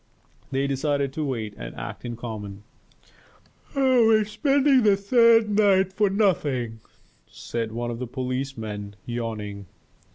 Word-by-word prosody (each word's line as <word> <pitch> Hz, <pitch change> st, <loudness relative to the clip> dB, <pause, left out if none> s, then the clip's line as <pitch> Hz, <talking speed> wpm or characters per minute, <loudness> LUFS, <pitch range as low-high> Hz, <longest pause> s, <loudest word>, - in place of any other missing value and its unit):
They 135 Hz, +1 st, 0 dB
decided 140 Hz, 0 st, -1 dB
to 155 Hz, -, -3 dB
wait 115 Hz, -7 st, -3 dB
and -, -, -8 dB
act -, -, -7 dB
in 120 Hz, -1 st, -4 dB
common. 105 Hz, -4 st, -7 dB, 1.1 s
"We 275 Hz, -, +1 dB, 0.3 s
are 215 Hz, -1 st, +2 dB
spending 275 Hz, +4 st, +3 dB
the 205 Hz, -3 st, +4 dB
third 230 Hz, +2 st, +5 dB
night 195 Hz, -2 st, +3 dB
for 205 Hz, 0 st, +2 dB
nothing," 145 Hz, -, 0 dB, 0.5 s
said 115 Hz, -1 st, -5 dB
one 120 Hz, +1 st, -3 dB
of 115 Hz, -, -6 dB
the 125 Hz, -, -4 dB
policemen, 120 Hz, -5 st, -4 dB
yawning. 105 Hz, -4 st, -5 dB
135 Hz, 130 wpm, -25 LUFS, -, 1.1 s, third